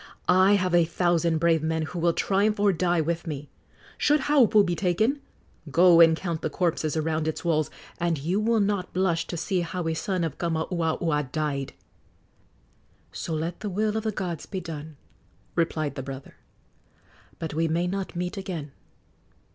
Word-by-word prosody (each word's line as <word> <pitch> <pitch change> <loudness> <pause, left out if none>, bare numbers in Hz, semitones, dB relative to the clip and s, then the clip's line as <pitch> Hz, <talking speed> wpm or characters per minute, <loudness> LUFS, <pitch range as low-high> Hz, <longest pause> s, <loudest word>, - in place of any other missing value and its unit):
I 185 +2 +5
have 185 -3 +1
a 175 -1 +6
thousand 170 0 +1
brave 165 -1 +3
men 160 0 -1
who 170 +3 -5
will 170 0 +2
triumph 205 +4 +1
or 200 -1 +4
die 175 -1 +1
with 170 +2 -2
me. 145 -2 -6 0.5
Should 295 0 +3
Haupu 245 -8 +4
be 175 - 0
taken, 215 - +1 0.5
go 170 +3 +6
and 165 -1 +6
count 170 -3 -3
the - - -1
corpses 160 -2 -1
around 155 0 -1
its 160 - -3
walls, 155 -3 +1 0.3
and 170 -2 0
you 170 +8 -1
will 225 +1 +2
not 200 -2 -1
blush 180 -3 +1
to 170 - -4
see 180 +2 -1
how 170 0 -3
a 165 - 0
son 185 +2 -2
of 160 -4 -4
Kamauaua 160 -3 -1
died!" 145 -3 -2 1.4
"So 165 - -4
let 165 +2 -3
the 210 - -4
will 210 +3 0
of 220 - 0
the 220 - 0
gods 175 -6 -4
be 190 - -4
done!" 155 -3 -8 0.6
replied 160 -3 0
the 135 - -5
brother. 135 0 -8 1.0
"But 160 -2 -5
we 165 +2 +1
may 165 +2 0
not 190 0 -3
meet 180 +3 -3
again." 170 -7 -5
170 Hz, 170 wpm, -26 LUFS, 160-185 Hz, 1.4 s, a